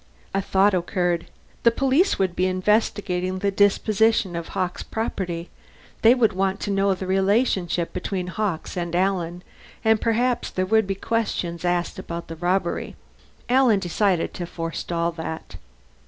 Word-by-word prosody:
A 195 Hz, -, +1 dB
thought 195 Hz, +1 st, +3 dB
occurred. 175 Hz, -1 st, 0 dB, 0.3 s
The 235 Hz, -, +6 dB
police 270 Hz, -, +2 dB
would 185 Hz, -2 st, 0 dB
be 185 Hz, -, +2 dB
investigating 185 Hz, -1 st, 0 dB
the 200 Hz, +1 st, 0 dB
disposition 205 Hz, -1 st, +2 dB
of 170 Hz, -1 st, -4 dB
Hawkes' 185 Hz, -2 st, -3 dB
property; 180 Hz, -6 st, -4 dB, 0.5 s
they 230 Hz, +3 st, +7 dB
would 225 Hz, -5 st, +3 dB
want 190 Hz, +1 st, 0 dB
to 205 Hz, -, -2 dB
know 195 Hz, 0 st, +2 dB
the 185 Hz, -, -6 dB
relationship 190 Hz, -2 st, +1 dB
between 180 Hz, 0 st, -3 dB
Hawkes 185 Hz, -2 st, -3 dB
and 175 Hz, -1 st, -3 dB
Alan, 180 Hz, -2 st, 0 dB, 0.4 s
and 220 Hz, -1 st, +4 dB
perhaps 240 Hz, +2 st, +1 dB
there 185 Hz, -, -1 dB
would 220 Hz, +1 st, +3 dB
be 195 Hz, -, -1 dB
questions 190 Hz, -6 st, -2 dB
asked 175 Hz, -1 st, -1 dB
about 170 Hz, 0 st, -6 dB
the 165 Hz, -, -5 dB
robbery. 175 Hz, +1 st, -1 dB, 0.5 s
Alan 250 Hz, -3 st, +4 dB
decided 185 Hz, -1 st, 0 dB
to 175 Hz, -, -5 dB
forestall 170 Hz, 0 st, -2 dB
that. 160 Hz, -1 st, -7 dB
190 Hz, 145 wpm, -24 LUFS, 175-210 Hz, 0.5 s, they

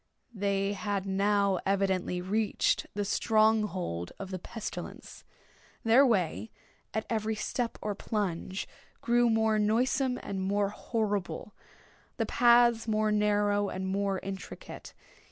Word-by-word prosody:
They 200 Hz, -1 st, 0 dB
had 200 Hz, 0 st, -2 dB
now 200 Hz, -1 st, +2 dB
evidently 190 Hz, -2 st, 0 dB
reached 210 Hz, +3 st, 0 dB
the 205 Hz, 0 st, -1 dB
strong 220 Hz, +1 st, +3 dB
hold 90 Hz, -, -4 dB
of 195 Hz, -1 st, -7 dB
the 185 Hz, -, -4 dB
pestilence. 220 Hz, +4 st, -7 dB, 0.6 s
Their 230 Hz, +4 st, +6 dB
way 205 Hz, -1 st, 0 dB, 0.4 s
at 220 Hz, -, -2 dB
every 220 Hz, -1 st, -1 dB
step 235 Hz, +2 st, -2 dB
or 210 Hz, -, -1 dB
plunge 195 Hz, -2 st, -3 dB, 0.3 s
grew 240 Hz, 0 st, +3 dB
more 220 Hz, -1 st, +2 dB
noisome 250 Hz, +4 st, +1 dB
and 195 Hz, -1 st, -4 dB
more 200 Hz, +1 st, +1 dB
horrible—the 205 Hz, -4 st, -5 dB
paths 235 Hz, -1 st, +4 dB
more 215 Hz, 0 st, +1 dB
narrow 205 Hz, -1 st, +2 dB
and 190 Hz, 0 st, -4 dB
more 195 Hz, 0 st, 0 dB
intricate. 195 Hz, 0 st, -8 dB
205 Hz, 120 wpm, -30 LUFS, 195-220 Hz, 0.6 s, Their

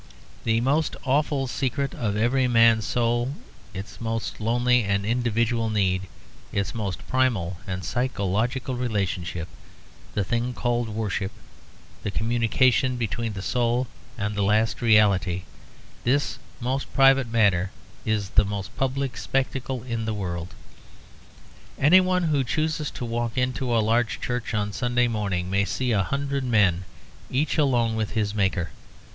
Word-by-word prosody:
The 115 Hz, 0 st, +2 dB
most 145 Hz, +6 st, +1 dB
awful 140 Hz, 0 st, +1 dB
secret 135 Hz, +1 st, -2 dB
of 105 Hz, -3 st, -2 dB
every 125 Hz, +4 st, +2 dB
man's 115 Hz, -2 st, +5 dB
soul, 120 Hz, +3 st, 0 dB, 0.4 s
its 95 Hz, +5 st, -8 dB
most 115 Hz, -1 st, -3 dB
lonely 120 Hz, +2 st, +3 dB
and 100 Hz, 0 st, 0 dB
individual 115 Hz, 0 st, +1 dB
need, 95 Hz, -3 st, +1 dB, 0.4 s
its 100 Hz, -2 st, -1 dB
most 100 Hz, -4 st, -4 dB
primal 115 Hz, -10 st, +1 dB
and 90 Hz, -1 st, -4 dB
psychological 125 Hz, +2 st, -1 dB
relationship, 95 Hz, -8 st, -2 dB, 0.7 s
the 105 Hz, -, +1 dB
thing 120 Hz, +5 st, -1 dB
called 120 Hz, -2 st, 0 dB
worship, 105 Hz, -2 st, -2 dB, 0.7 s
the -, -, -3 dB
communication 120 Hz, +4 st, +2 dB
between 115 Hz, -1 st, -2 dB
the 95 Hz, -1 st, -6 dB
soul 120 Hz, +2 st, +1 dB, 0.3 s
and 105 Hz, -1 st, -2 dB
the 105 Hz, -, -1 dB
last 105 Hz, +3 st, +2 dB
reality 100 Hz, -6 st, +3 dB, 0.6 s
this 140 Hz, +4 st, +1 dB, 0.2 s
most 130 Hz, +2 st, -2 dB
private 135 Hz, -1 st, +5 dB
matter 100 Hz, -5 st, +3 dB, 0.3 s
is 105 Hz, -3 st, -1 dB
the 105 Hz, -, +5 dB
most 100 Hz, -1 st, -5 dB
public 135 Hz, 0 st, -1 dB
spectacle 130 Hz, -2 st, -2 dB
in 115 Hz, -3 st, -3 dB
the 110 Hz, -1 st, -2 dB
world. 90 Hz, -3 st, -4 dB, 1.2 s
Anyone 185 Hz, +4 st, +5 dB
who 150 Hz, -4 st, +2 dB
chooses 155 Hz, +4 st, -1 dB
to 125 Hz, -, -6 dB
walk 120 Hz, +1 st, -2 dB
into 125 Hz, 0 st, 0 dB
a 115 Hz, -, +3 dB
large 115 Hz, +1 st, +1 dB
church 125 Hz, -3 st, -3 dB
on 105 Hz, -1 st, -1 dB
Sunday 125 Hz, +1 st, +1 dB
morning 100 Hz, -6 st, -1 dB
may 100 Hz, +1 st, +3 dB
see 120 Hz, +6 st, -1 dB
a 105 Hz, -3 st, +3 dB
hundred 140 Hz, +4 st, -1 dB
men 100 Hz, -7 st, +3 dB, 0.4 s
each 145 Hz, +4 st, 0 dB
alone 120 Hz, -6 st, +2 dB
with 110 Hz, -1 st, -2 dB
his 105 Hz, -2 st, 0 dB
Maker. 95 Hz, -4 st, 0 dB
115 Hz, 140 wpm, -25 LUFS, 100-125 Hz, 1.2 s, man's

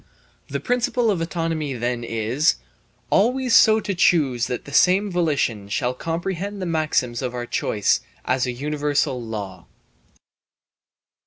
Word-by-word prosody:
The -, -, -3 dB
principle 245 Hz, -2 st, +1 dB
of 180 Hz, -5 st, -1 dB
autonomy 165 Hz, -4 st, -2 dB
then 120 Hz, 0 st, -2 dB
is: 115 Hz, +6 st, +1 dB, 0.6 s
"Always 250 Hz, +4 st, +3 dB
so 220 Hz, 0 st, +6 dB
to 200 Hz, -, -2 dB
choose 140 Hz, -10 st, +2 dB
that 125 Hz, -, -4 dB
the 140 Hz, -, -10 dB
same 190 Hz, +6 st, +4 dB
volition 140 Hz, -, 0 dB
shall 125 Hz, +4 st, -1 dB
comprehend 175 Hz, +7 st, -4 dB
the 185 Hz, -, -3 dB
maxims 155 Hz, -8 st, 0 dB
of 125 Hz, -1 st, -3 dB
our 120 Hz, 0 st, -3 dB
choice 105 Hz, -3 st, 0 dB, 0.2 s
as 130 Hz, 0 st, +1 dB
a -, -, -1 dB
universal 145 Hz, 0 st, -1 dB
law." 105 Hz, -5 st, -7 dB
150 Hz, 135 wpm, -22 LUFS, 120-180 Hz, 0.6 s, so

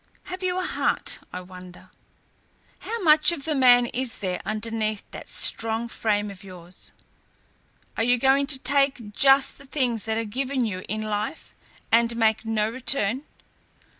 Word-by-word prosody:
Have 370 Hz, +1 st, -8 dB
you 365 Hz, -1 st, -1 dB
a 370 Hz, -, -1 dB
heart, -, -, 0 dB
I 180 Hz, -, -6 dB
wonder? 180 Hz, 0 st, -13 dB, 0.9 s
How 460 Hz, -2 st, -5 dB
much 310 Hz, +1 st, +6 dB
of 310 Hz, -5 st, -5 dB
the 315 Hz, -, +1 dB
man 245 Hz, -3 st, +5 dB
is 245 Hz, 0 st, -3 dB
there 185 Hz, -2 st, -3 dB
underneath 215 Hz, -1 st, -2 dB
that -, -, -9 dB
strong 225 Hz, +1 st, +1 dB
frame 210 Hz, -3 st, -1 dB
of 195 Hz, -1 st, -13 dB
yours? 180 Hz, -2 st, -10 dB, 1.1 s
Are -, -, +1 dB
you 245 Hz, +2 st, +3 dB
going 270 Hz, +3 st, +3 dB
to 280 Hz, -2 st, 0 dB
take 265 Hz, -5 st, +1 dB
just 270 Hz, +3 st, +4 dB
the 280 Hz, -, -14 dB
things 250 Hz, -6 st, -1 dB
that 220 Hz, 0 st, -1 dB
are 225 Hz, -, -1 dB
given 260 Hz, +3 st, -2 dB
you 185 Hz, -4 st, -4 dB
in 215 Hz, +2 st, -2 dB
life, 210 Hz, +7 st, -4 dB, 0.4 s
and 235 Hz, 0 st, +3 dB
make 220 Hz, -1 st, +1 dB
no 215 Hz, -1 st, 0 dB
return? 255 Hz, +1 st, 0 dB
230 Hz, 160 wpm, -24 LUFS, 210-270 Hz, 1.1 s, much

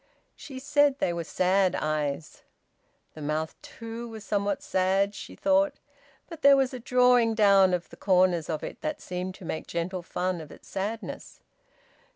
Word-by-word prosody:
She 270 Hz, -3 st, -10 dB
said 285 Hz, +1 st, +2 dB
they 175 Hz, -, 0 dB
were 170 Hz, 0 st, -3 dB
sad 185 Hz, +3 st, +2 dB
eyes. 150 Hz, 0 st, -2 dB, 0.7 s
The 155 Hz, -, -10 dB
mouth, 155 Hz, +2 st, -2 dB
too, 230 Hz, +1 st, -8 dB
was 220 Hz, -2 st, -9 dB
somewhat 200 Hz, -1 st, -1 dB
sad 190 Hz, +2 st, +1 dB
(she -, -, -9 dB
thought), 290 Hz, 0 st, +2 dB, 0.5 s
but 330 Hz, -2 st, -10 dB
there 280 Hz, -1 st, +7 dB
was 265 Hz, -1 st, +1 dB
a 255 Hz, -, -5 dB
drawing 250 Hz, -2 st, +4 dB
down 200 Hz, -3 st, +5 dB
of 180 Hz, -1 st, -1 dB
the -, -, -12 dB
corners 180 Hz, -4 st, +2 dB
of 155 Hz, -2 st, -3 dB
it -, -, -7 dB
that 305 Hz, -1 st, -3 dB
seemed 180 Hz, +1 st, -5 dB
to 190 Hz, -, -12 dB
make 160 Hz, -, -4 dB
gentle 175 Hz, +2 st, -3 dB
fun 180 Hz, 0 st, -2 dB
of 155 Hz, -, -11 dB
its -, -, -15 dB
sadness. 210 Hz, +4 st, -5 dB
195 Hz, 170 wpm, -27 LUFS, 175-250 Hz, 0.7 s, there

